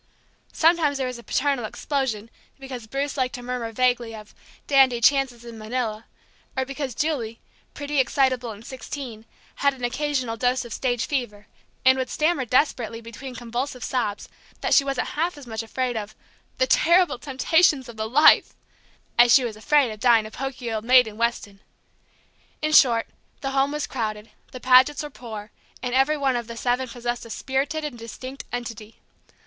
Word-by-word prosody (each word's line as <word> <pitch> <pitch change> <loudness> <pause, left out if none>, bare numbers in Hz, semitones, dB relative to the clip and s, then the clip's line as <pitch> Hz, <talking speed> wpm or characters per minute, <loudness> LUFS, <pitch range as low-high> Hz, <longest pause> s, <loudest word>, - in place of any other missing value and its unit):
Sometimes 320 -3 +3
there 265 - -1
was 250 -1 -5
a - - -12
paternal 275 -1 0
explosion 230 -3 -3 0.3
because 260 -4 -8
Bruce 275 +4 -3
liked 255 0 0
to 245 - -8
murmur 245 -2 -4
vaguely 245 -1 +1
of 215 -1 -12 0.3
"dandy 265 -4 +4
chances 250 -2 +2
in 230 -1 -9
Manila," 220 -1 -3 0.5
or 265 - +1
because 275 -2 -5
Julie, 255 -8 -2 0.4
pretty, 290 0 -2
excitable, 255 -2 +1
and 215 +1 -9
sixteen, 255 -4 -7 0.3
had 280 -1 +2
an 250 - -12
occasional 255 -2 -1
dose 250 +2 +1
of 235 - -7
stage 245 -2 -1
fever, 240 -7 -3 0.4
and 260 0 +6
would 260 - -2
stammer 305 -4 +1
desperately 240 -3 +1
between 235 +3 -9
convulsive 245 +2 -4
sobs 220 -6 -2 0.3
that - - +1
she 280 - +6
wasn't 275 -2 -2
half 330 +1 -2
as 285 - -11
much 220 -2 -4
afraid 245 +2 -2
of 215 -1 -5 0.4
"the - - +3
terrible 350 - +3
temptations 290 0 +2
of 235 - -10
the 220 0 -3
life" 295 +6 +5 0.6
as 240 0 +7
she 260 - +7
was 230 -3 -3
afraid 260 +3 +2
of 215 - -9
dying 230 -2 +4
a 215 - -9
poky 260 -2 -5
old 215 -1 -2
maid 250 +1 +6
in 215 -1 -8
Weston. 225 -3 -2 1.0
In 310 - +1
short, 235 -6 +6 0.4
the 270 -1 -2
home 275 +1 +2
was 300 0 -2
crowded, 215 -3 -4 0.2
the 255 - -8
Pagets 260 +4 +5
were 295 - -7
poor, 220 -5 -9 0.3
and 250 -1 -2
every 270 +4 +3
one 270 -3 +1
of 240 -2 -3
the 230 -1 -8
seven 250 +2 0
possessed 240 0 -4
a 230 - -11
spirited 275 +6 -2
and 260 -6 -6
distinct 255 +4 -8
entity. 230 -3 -6
250 Hz, 175 wpm, -24 LUFS, 230-275 Hz, 1.0 s, as